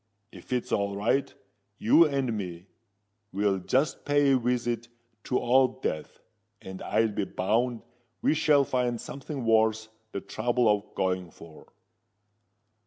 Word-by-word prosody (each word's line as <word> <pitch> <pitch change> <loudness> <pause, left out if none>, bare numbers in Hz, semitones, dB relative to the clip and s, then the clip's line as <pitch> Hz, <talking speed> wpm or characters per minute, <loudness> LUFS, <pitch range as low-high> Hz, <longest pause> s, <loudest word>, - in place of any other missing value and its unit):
If 90 - -14
it's 125 -1 -1
all 100 -1 0
right, 115 +7 0 0.5
you 160 +9 +5
and 135 -5 -1
me 90 -4 -6 0.7
will 100 0 +1
just 135 +9 0
pay 145 -1 +3
a 135 - +5
visit 120 -1 -1 0.4
to 125 - 0
Old 130 +1 +2
Death; 80 -1 -4 0.4
and 95 0 -9
I'll 110 +1 +1
be 100 - -2
bound 115 +6 -1 0.4
we - - +2
shall 150 -2 +4
find 125 -3 -1
something 135 -2 -6
worth 110 0 +2 0.2
the - - -3
trouble 120 +3 0
of 105 -1 0
going 90 -2 -1
for." 80 -1 -15
115 Hz, 135 wpm, -27 LUFS, 100-130 Hz, 0.7 s, you